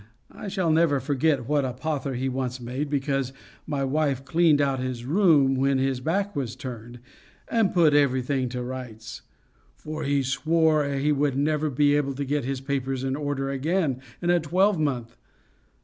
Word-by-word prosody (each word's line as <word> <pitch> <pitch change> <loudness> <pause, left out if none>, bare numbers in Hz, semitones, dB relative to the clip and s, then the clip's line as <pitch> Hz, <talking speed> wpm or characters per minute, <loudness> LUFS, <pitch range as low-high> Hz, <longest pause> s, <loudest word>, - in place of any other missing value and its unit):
I - - -8
shall 190 -4 0
never 155 -3 +3
forget 140 -1 0
what 145 -1 +2
a 130 -2 -2
pother 140 0 -3
he 130 +2 -2
once 130 -1 -3
made, 130 +5 -4
because 135 -2 -1 0.3
my 145 -3 -1
wife 135 -1 0
cleaned 160 +1 +3
out 135 -2 +1
his 125 -2 -4
room 150 -4 +4
when 135 +1 +2
his 135 -1 0
back 195 +8 -1
was 130 -4 -3
turned, 120 -2 -8 0.5
and 225 -5 +2
put 165 -4 +4
everything 130 -2 +2
to 125 0 -4
rights; 125 -3 -7 0.5
for 155 +1 -7
he 140 -1 +1
swore 155 +3 +2
he 140 +2 0
would 140 -2 +1
never 150 +1 +1
be 145 +2 +3
able 140 -2 0
to 140 +1 -3
get 145 -1 -1
his 135 0 -3
papers 135 -1 -2
in 135 0 -1
order 145 -2 -2
again 140 -1 0 0.2
in 175 - +3
a 175 - +4
twelve 180 +4 +2
month. 125 -6 -2
140 Hz, 175 wpm, -25 LUFS, 130-155 Hz, 0.5 s, room